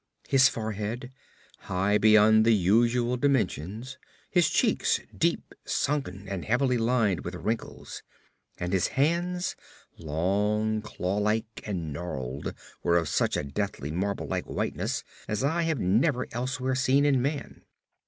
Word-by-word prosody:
His 135 Hz, -1 st, +6 dB
forehead, 110 Hz, +3 st, -4 dB, 0.6 s
high 100 Hz, +3 st, +2 dB
beyond 110 Hz, 0 st, +6 dB
the 115 Hz, 0 st, +5 dB
usual 120 Hz, +6 st, +2 dB
dimensions; 120 Hz, -, -1 dB, 0.3 s
his 175 Hz, -4 st, +4 dB
cheeks, -, -, +2 dB, 0.2 s
deep -, -, 0 dB
sunken 105 Hz, -10 st, -2 dB
and 95 Hz, -2 st, -4 dB
heavily 125 Hz, +1 st, +1 dB
lined 115 Hz, -5 st, +1 dB
with 90 Hz, +1 st, -5 dB
wrinkles; 110 Hz, +5 st, -4 dB, 0.6 s
and 90 Hz, +2 st, -3 dB
his 95 Hz, -, +2 dB
hands, 175 Hz, +5 st, +1 dB, 0.4 s
long, 105 Hz, +7 st, 0 dB
claw 100 Hz, -2 st, -3 dB
like 110 Hz, +2 st, -1 dB
and 85 Hz, -7 st, -3 dB
gnarled, 70 Hz, -4 st, -5 dB, 0.3 s
were 85 Hz, 0 st, +3 dB
of 80 Hz, -3 st, 0 dB
such 75 Hz, -, +1 dB
a -, -, -1 dB
deathly, 75 Hz, -1 st, -3 dB
marble 100 Hz, +5 st, -2 dB
like -, -, -2 dB
whiteness -, -, -2 dB, 0.2 s
as 105 Hz, +3 st, -2 dB
I 160 Hz, +5 st, +1 dB
have 160 Hz, -5 st, 0 dB
never 120 Hz, -, +2 dB
elsewhere 130 Hz, +2 st, -2 dB
seen 135 Hz, +2 st, +3 dB
in 135 Hz, -3 st, +3 dB
man. 140 Hz, +2 st, -3 dB
110 Hz, 135 wpm, -27 LUFS, 95-130 Hz, 0.6 s, His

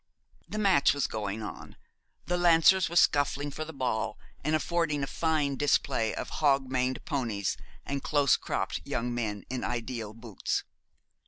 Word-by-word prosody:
The 215 Hz, -, -4 dB
match 190 Hz, -10 st, +4 dB
was 140 Hz, -, +1 dB
going 105 Hz, 0 st, -3 dB
on. 105 Hz, -, -8 dB, 0.5 s
The 180 Hz, -, 0 dB
Lancers 175 Hz, +1 st, +5 dB
were 170 Hz, -, -6 dB
scuffling 145 Hz, -2 st, +3 dB
for 155 Hz, +3 st, -4 dB
the 160 Hz, -, -7 dB
ball, 125 Hz, -7 st, -2 dB, 0.3 s
and 155 Hz, +2 st, +2 dB
affording 155 Hz, -3 st, 0 dB
a -, -, +1 dB
fine 150 Hz, -2 st, 0 dB
display 135 Hz, -5 st, +1 dB
of -, -, -4 dB
hog 135 Hz, -3 st, +3 dB
maned 130 Hz, 0 st, -1 dB
ponies 115 Hz, -, -1 dB, 0.3 s
and 140 Hz, 0 st, -2 dB
close 145 Hz, -3 st, +3 dB
cropped -, -, -2 dB
young 120 Hz, +1 st, -2 dB
men 105 Hz, -4 st, -3 dB
in 130 Hz, -1 st, -3 dB
ideal 115 Hz, -3 st, -3 dB
boots. 115 Hz, -4 st, -3 dB
140 Hz, 155 wpm, -29 LUFS, 115-155 Hz, 0.5 s, Lancers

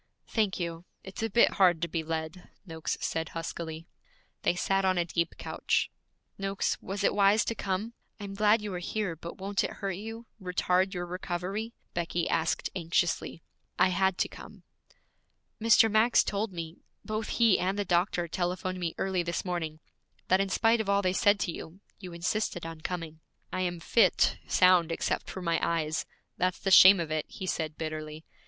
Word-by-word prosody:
'Thank 210 Hz, -5 st, 0 dB
you. 170 Hz, 0 st, -4 dB, 0.2 s
It's 190 Hz, +2 st, -8 dB
a 225 Hz, -, 0 dB
bit 235 Hz, +3 st, +5 dB
hard 175 Hz, -3 st, +5 dB
to -, -, +1 dB
be 165 Hz, 0 st, -2 dB
led,' 160 Hz, +2 st, -5 dB, 0.2 s
Noakes 160 Hz, -3 st, -4 dB
said 160 Hz, -1 st, -2 dB
huskily. 165 Hz, -1 st, -5 dB, 0.6 s
They -, -, +1 dB
sat 195 Hz, +2 st, +1 dB
on 185 Hz, -1 st, +2 dB
a 175 Hz, -, +2 dB
deep 170 Hz, 0 st, -2 dB
couch. -, -, -1 dB, 0.5 s
'Noakes, 195 Hz, 0 st, -1 dB
was 195 Hz, +2 st, -4 dB
it -, -, +3 dB
wise 205 Hz, +1 st, +4 dB
to -, -, -1 dB
come? 205 Hz, +2 st, -3 dB, 0.3 s
I -, -, -7 dB
am 200 Hz, -1 st, -6 dB
glad 210 Hz, +2 st, +3 dB
you 205 Hz, -2 st, -4 dB
are 180 Hz, -, -3 dB
here, 190 Hz, -1 st, -2 dB
but 170 Hz, +2 st, -9 dB
won't 195 Hz, +1 st, -1 dB
it -, -, -3 dB
hurt 195 Hz, -1 st, -3 dB
you, 225 Hz, +3 st, -7 dB, 0.2 s
retard 185 Hz, +1 st, +1 dB
your 175 Hz, 0 st, -3 dB
recovery?' 185 Hz, +5 st, -4 dB, 0.2 s
Becky 170 Hz, 0 st, -1 dB
asked 160 Hz, 0 st, 0 dB
anxiously. 170 Hz, -1 st, -1 dB, 0.3 s
'I 185 Hz, -, +4 dB
had 190 Hz, 0 st, +1 dB
to -, -, +1 dB
come.' -, -, -13 dB, 1.0 s
'Mr. 225 Hz, 0 st, +6 dB
Max 220 Hz, +3 st, +4 dB
told 205 Hz, +1 st, -2 dB
me 165 Hz, -1 st, -6 dB, 0.3 s
both 215 Hz, 0 st, -3 dB
he 230 Hz, -4 st, +5 dB
and 190 Hz, +3 st, 0 dB
the 205 Hz, -, -1 dB
doctor 175 Hz, 0 st, +1 dB
telephoned 185 Hz, +1 st, -2 dB
me 170 Hz, -2 st, -3 dB
early 190 Hz, -2 st, 0 dB
this 170 Hz, +2 st, -3 dB
morning 160 Hz, -4 st, -3 dB, 0.5 s
that 185 Hz, +1 st, +4 dB
in 195 Hz, -, -1 dB
spite 225 Hz, +3 st, +3 dB
of 205 Hz, -, -4 dB
all 200 Hz, 0 st, +3 dB
they 185 Hz, 0 st, +1 dB
said 205 Hz, +2 st, +3 dB
to 175 Hz, -, 0 dB
you, 165 Hz, +3 st, -9 dB, 0.2 s
you 185 Hz, -3 st, -8 dB
insisted 175 Hz, +1 st, -2 dB
on 165 Hz, -1 st, -7 dB
coming.' 165 Hz, -2 st, -5 dB, 0.3 s
'I 185 Hz, -, -1 dB
am 175 Hz, -1 st, -2 dB
fit, 230 Hz, +7 st, +3 dB
sound 180 Hz, -3 st, +4 dB
except 165 Hz, -, -2 dB
for 190 Hz, -, -6 dB
my 170 Hz, -1 st, +1 dB
eyes; 155 Hz, -2 st, -1 dB, 0.3 s
that's 185 Hz, 0 st, 0 dB
the 195 Hz, -, -2 dB
shame 190 Hz, +1 st, +9 dB
of 165 Hz, -2 st, -3 dB
it,' 155 Hz, -1 st, -1 dB
he 190 Hz, -, -7 dB
said 160 Hz, -4 st, -2 dB
bitterly. 155 Hz, 0 st, -5 dB
180 Hz, 185 wpm, -29 LUFS, 170-200 Hz, 1.0 s, shame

